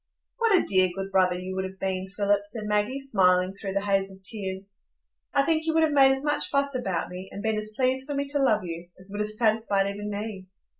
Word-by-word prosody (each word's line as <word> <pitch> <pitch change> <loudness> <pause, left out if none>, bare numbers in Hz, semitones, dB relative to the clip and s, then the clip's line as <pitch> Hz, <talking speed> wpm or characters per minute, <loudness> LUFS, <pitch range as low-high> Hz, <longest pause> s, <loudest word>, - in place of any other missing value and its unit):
"What 455 -4 +4
a - - -1
dear, 185 -2 +4
good 195 0 -5
brother 185 -2 +3
you 185 +1 -5
would 190 - -1
have 190 0 -7
been, 190 0 -2
Philip," 200 +1 +1
said 215 +1 -7
Maggie, 210 +6 0
smiling 185 -8 +3
through 195 -1 -5
the 200 - 0
haze 195 -1 +1
of 190 - -12
tears. 195 -1 -4 0.5
"I 280 - +3
think 320 +1 0
you 320 - +1
would 320 - +4
have 310 -2 +2
made 270 -1 +6
as 270 +2 0
much 295 0 0
fuss 280 0 +1
about 195 -10 -2
me, 185 +1 -8
and 200 - -7
been 220 0 +1
as 215 0 -3
pleased 260 +2 +1
for 290 - -3
me 280 0 -1
to 285 0 +2
love 220 -7 +3
you, 170 0 -6
as 185 +1 -11
would 205 +1 -3
have 210 - -1
satisfied 215 -2 +2
even 205 +1 -4
me. 205 -2 -5
205 Hz, 245 wpm, -26 LUFS, 190-260 Hz, 0.5 s, made